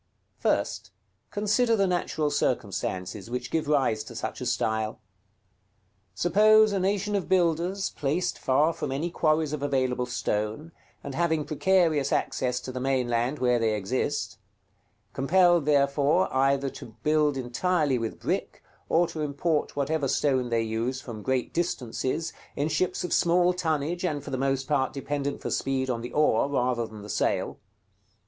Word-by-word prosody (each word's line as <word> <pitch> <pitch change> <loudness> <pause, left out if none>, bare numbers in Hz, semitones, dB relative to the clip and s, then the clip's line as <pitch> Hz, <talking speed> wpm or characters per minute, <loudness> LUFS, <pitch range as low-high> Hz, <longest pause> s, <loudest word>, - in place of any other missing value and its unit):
First, - - 0 0.4
consider 220 +3 +2
the 200 -2 +2
natural 175 -4 0
circumstances 100 -6 -2
which 125 0 -4
give 160 -2 0
rise 135 -7 +2
to - - -10
such - - -4
a - - -2
style. 110 -1 -1 1.2
Suppose 215 - +5
a 200 - 0
nation 200 +2 0
of 195 - -2
builders, 180 +2 +1
placed 155 +6 -1
far 150 +5 +2
from - - -4
any 155 +6 -2
quarries 155 -2 +1
of 150 - -3
available 130 -3 0
stone, 110 +5 -2 0.3
and 140 - -6
having 160 -1 0
precarious 165 -3 +2
access 125 -1 0
to 130 - -6
the 130 - -5
mainland 125 0 0
where 125 -2 +2
they 110 -1 +1
exist; 130 +8 -2 0.7
compelled 175 +3 +3
therefore 145 +4 +2
either 135 0 +2
to 110 - -11
build 150 -2 +2
entirely 140 +2 0
with 115 -1 -4
brick, - - -3 0.3
or 170 +2 +4
to 155 - -5
import 150 +2 -1
whatever 145 +1 0
stone 130 -2 +1
they 115 -1 +1
use 115 +4 -2
from 115 -5 -8
great 130 +1 -1
distances, 160 -2 -2 0.2
in 145 +2 0
ships 180 +3 0
of 180 - -2
small 175 +1 +3
tonnage, 165 -1 -1
and 150 -6 -1
for 145 - -8
the - - -1
most 135 0 -1
part 135 -3 +1
dependent 140 0 -3
for - - -3
speed 130 -1 0
on 115 -1 -3
the 120 - -6
oar 145 -3 +2
rather 125 -4 0
than 110 -1 -11
the - - -9
sail. - - -1
140 Hz, 155 wpm, -27 LUFS, 125-165 Hz, 1.2 s, Suppose